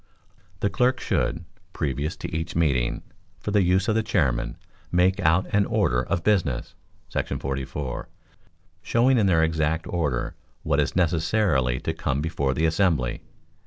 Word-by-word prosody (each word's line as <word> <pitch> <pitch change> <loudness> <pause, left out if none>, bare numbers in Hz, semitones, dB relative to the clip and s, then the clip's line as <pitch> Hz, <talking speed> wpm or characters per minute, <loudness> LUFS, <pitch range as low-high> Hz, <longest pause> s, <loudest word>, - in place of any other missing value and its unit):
The 100 - +2
clerk 125 +6 +2
should, 85 0 -1 0.3
previous 75 +3 -2
to - - -6
each 80 +1 -3
meeting, 70 -7 +1 0.4
for 105 - -4
the 105 -1 +4
use 95 +3 +2
of 110 - +3
the 110 - +2
chairman, 65 - 0 0.3
make 90 +2 +3
out 80 +4 +3
an 105 -1 +3
order - - +2
of 85 +6 -2
business 90 - +1 0.4
[§ - - -2
44], 65 0 -4 0.7
showing 125 +2 +3
in 100 - +3
their 80 -3 +4
exact 80 0 0
order 75 -9 -1 0.3
what - - +1
is - - 0
necessarily 80 - +2
to - - -2
come 70 - -1
before 70 -4 -1
the 80 - +1
assembly. 80 -7 +1
80 Hz, 150 wpm, -25 LUFS, 70-95 Hz, 0.7 s, the